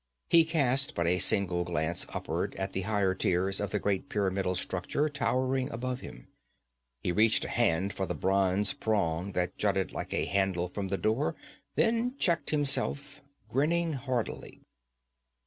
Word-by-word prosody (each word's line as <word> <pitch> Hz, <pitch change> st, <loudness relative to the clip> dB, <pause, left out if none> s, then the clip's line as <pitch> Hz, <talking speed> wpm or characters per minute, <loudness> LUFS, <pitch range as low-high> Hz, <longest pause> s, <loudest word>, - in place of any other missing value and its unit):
He 165 Hz, -1 st, +7 dB
cast 140 Hz, -4 st, +3 dB
but 85 Hz, -, 0 dB
a 90 Hz, +2 st, +2 dB
single 90 Hz, -2 st, +3 dB
glance 85 Hz, -1 st, -1 dB
upward -, -, -3 dB
at 95 Hz, 0 st, -3 dB
the 95 Hz, -, -2 dB
higher 100 Hz, -3 st, +2 dB
tiers 95 Hz, +1 st, +1 dB
of 100 Hz, -, -2 dB
the -, -, -1 dB
great 100 Hz, +6 st, -1 dB
pyramidal 95 Hz, -3 st, 0 dB
structure 95 Hz, +11 st, -1 dB
towering 130 Hz, -2 st, 0 dB
above 125 Hz, -1 st, -4 dB
him. -, -, -11 dB, 0.8 s
He 90 Hz, -, 0 dB
reached 110 Hz, +4 st, +3 dB
a -, -, -5 dB
hand 100 Hz, -4 st, +1 dB
for 95 Hz, -, -3 dB
the -, -, -3 dB
bronze 95 Hz, +1 st, +1 dB
prong 100 Hz, -3 st, -1 dB
that 90 Hz, -1 st, -2 dB
jutted -, -, 0 dB
like -, -, -6 dB
a -, -, 0 dB
handle 95 Hz, -3 st, 0 dB
from 100 Hz, +1 st, -4 dB
the 100 Hz, +1 st, -1 dB
door 110 Hz, +9 st, 0 dB, 0.4 s
then 235 Hz, +3 st, +1 dB
checked 170 Hz, -8 st, +1 dB
himself, 145 Hz, -1 st, +1 dB, 0.3 s
grinning 165 Hz, +5 st, +1 dB
hardly. 130 Hz, -4 st, -4 dB
100 Hz, 155 wpm, -29 LUFS, 95-135 Hz, 0.8 s, He